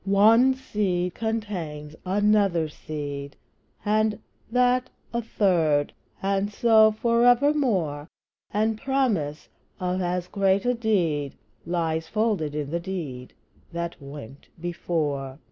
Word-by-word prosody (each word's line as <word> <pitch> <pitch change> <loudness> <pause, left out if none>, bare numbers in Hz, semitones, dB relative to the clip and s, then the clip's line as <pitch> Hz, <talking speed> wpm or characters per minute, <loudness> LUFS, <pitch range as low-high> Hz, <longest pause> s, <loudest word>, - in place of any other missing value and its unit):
One 220 +7 +5
seed 190 -8 -1
contains 180 -10 -4
another 200 -4 +3
seed, 145 -2 -6 0.5
And 215 0 +2 0.3
that 250 +1 +2 0.2
a 235 - 0
third, 170 -10 +1 0.3
and 195 +1 0
so 220 -1 +5
for 235 +2 +1
evermore; 240 - +2 0.4
And 215 +1 0
promise 230 - 0 0.3
of 185 0 -1
as 180 0 -1
great 195 +1 +1
a 245 - +3
deed 175 - 0 0.3
Lies 160 -2 -1
folded 205 -8 0
in 150 -1 -3
the 170 - 0
deed 160 -9 -6 0.4
that 170 0 -3
went 140 -1 -10
before. 150 -6 -2
190 Hz, 110 wpm, -25 LUFS, 155-220 Hz, 0.5 s, One